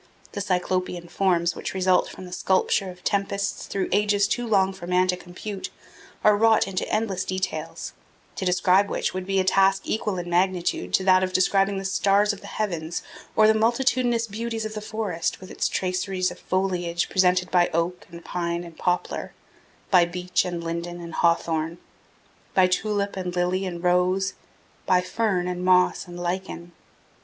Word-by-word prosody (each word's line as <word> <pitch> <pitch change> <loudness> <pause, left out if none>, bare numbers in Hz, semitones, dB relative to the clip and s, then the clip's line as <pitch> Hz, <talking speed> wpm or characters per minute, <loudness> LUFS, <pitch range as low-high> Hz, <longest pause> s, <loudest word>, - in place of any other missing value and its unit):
The 200 - -4
Cyclopean 180 -2 -1
forms 175 -3 +1
which - - -5
result 185 -1 +2
from 185 - -10
the 180 - -11
sculpture 190 +1 +1
of 180 -1 -12
tempests 200 0 -1
through 195 -1 -2
ages 205 0 +3
too 240 +3 -1
long 195 -3 +3
for 180 -2 -9
man 180 +1 +3
to 180 - +2
compute, 190 +3 -7 0.5
are 210 - +6
wrought 220 0 +4
into 190 -1 -3
endless 210 -4 0
details, 185 0 -4 0.4
to - - -3
describe 185 +2 +3
which - - -1
would 185 0 -4
be 195 0 +1
a - - +3
task 195 +1 +3
equal 210 -3 -1
in 175 0 -4
magnitude 175 - 0
to - - +1
that 185 -1 +5
of 185 0 -2
describing 195 +2 +2
the 195 - -4
stars 200 +2 +3
of 200 - -10
the 200 - -10
heavens 175 -6 -3 0.3
or 215 - +6
the 220 - +6
multitudinous 235 +1 +2
beauties 225 +1 -4
of 215 - -5
the 215 - -5
forest 205 -6 -3
with 185 - -11
its - - -1
traceries 185 0 -1
of - - -11
foliage 180 -2 -1
presented 180 -1 +2
by 175 -1 +4
oak 170 +2 -2
and 170 0 -11
pine 170 -1 -2
and 170 -2 -12
poplar, 180 -1 -1 0.6
by 180 -3 +7
beech 180 0 0
and 175 -2 -4
linden 170 +1 -4
and 170 -1 -8
hawthorn, 165 -1 +1 0.8
by 185 - +6
tulip 200 +2 0
and 180 -2 -4
lily 180 +2 0
and 175 -1 -6
rose, 180 +2 +2 0.5
by 185 - +5
fern 185 -1 -1
and 180 0 -3
moss 180 0 +3
and 175 0 -9
lichen. 175 -1 -4
185 Hz, 175 wpm, -25 LUFS, 180-200 Hz, 0.8 s, by